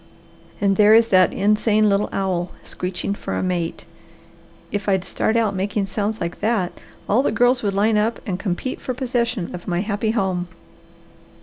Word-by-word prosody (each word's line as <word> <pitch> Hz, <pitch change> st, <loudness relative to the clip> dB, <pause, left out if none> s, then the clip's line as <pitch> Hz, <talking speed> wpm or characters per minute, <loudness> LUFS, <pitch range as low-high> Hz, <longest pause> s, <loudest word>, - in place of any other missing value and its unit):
And 195 Hz, -1 st, +2 dB
there 210 Hz, +1 st, +7 dB
is 230 Hz, 0 st, +5 dB
that 185 Hz, -1 st, +5 dB
insane 215 Hz, +1 st, +2 dB
little 200 Hz, 0 st, +1 dB
owl 185 Hz, -2 st, -1 dB
screeching 180 Hz, +2 st, -3 dB
for -, -, -5 dB
a -, -, -1 dB
mate. 175 Hz, -2 st, -2 dB, 0.9 s
If 205 Hz, 0 st, -2 dB
I'd 190 Hz, -2 st, +2 dB
start 220 Hz, +4 st, 0 dB
out 220 Hz, -3 st, +1 dB
making 200 Hz, +2 st, -1 dB
sounds 210 Hz, +2 st, -2 dB
like 170 Hz, 0 st, -4 dB
that, 210 Hz, -5 st, 0 dB, 0.4 s
all 220 Hz, +6 st, +3 dB
the 275 Hz, -, 0 dB
girls 245 Hz, +3 st, +3 dB
would 200 Hz, -2 st, -1 dB
line 210 Hz, +2 st, +3 dB
up 225 Hz, +2 st, 0 dB
and 185 Hz, -3 st, -3 dB
compete 195 Hz, +6 st, -3 dB
for 255 Hz, -, -3 dB
possession 240 Hz, -6 st, -1 dB
of 175 Hz, -1 st, -8 dB
my 175 Hz, -1 st, 0 dB
happy 210 Hz, +1 st, -1 dB
home. 190 Hz, -5 st, 0 dB
205 Hz, 175 wpm, -21 LUFS, 185-220 Hz, 0.9 s, there